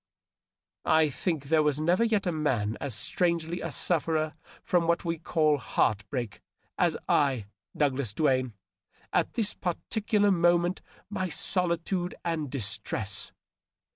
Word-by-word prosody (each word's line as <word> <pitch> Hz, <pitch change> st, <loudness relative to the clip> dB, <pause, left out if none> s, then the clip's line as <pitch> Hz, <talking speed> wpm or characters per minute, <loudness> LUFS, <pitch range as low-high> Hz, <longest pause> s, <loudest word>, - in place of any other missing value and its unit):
I 155 Hz, -1 st, +4 dB
think 160 Hz, 0 st, -2 dB
there 155 Hz, +2 st, +3 dB
was 150 Hz, -1 st, +1 dB
never 175 Hz, +7 st, +3 dB
yet 215 Hz, -4 st, +1 dB
a 180 Hz, -, +1 dB
man 125 Hz, -9 st, 0 dB
as 135 Hz, -6 st, -2 dB
strangely 170 Hz, +7 st, 0 dB
a -, -, -4 dB
sufferer 160 Hz, -2 st, 0 dB, 0.3 s
from 175 Hz, -2 st, +2 dB
what 170 Hz, +2 st, +1 dB
we 165 Hz, -1 st, -1 dB
call 155 Hz, -3 st, +2 dB
heart 110 Hz, -3 st, 0 dB
break, 120 Hz, -8 st, -4 dB, 0.3 s
as -, -, +2 dB
I, 135 Hz, -7 st, +2 dB, 0.3 s
Douglas 135 Hz, -5 st, +1 dB
Duane, 130 Hz, -1 st, +1 dB, 0.6 s
at -, -, +1 dB
this 220 Hz, -4 st, +1 dB
particular 205 Hz, +3 st, 0 dB
moment 175 Hz, 0 st, +3 dB
of -, -, -34 dB, 0.3 s
my 185 Hz, -3 st, -2 dB
solitude 175 Hz, +1 st, 0 dB
and 160 Hz, -4 st, -1 dB
distress. 105 Hz, -4 st, -2 dB
160 Hz, 135 wpm, -28 LUFS, 135-175 Hz, 0.6 s, I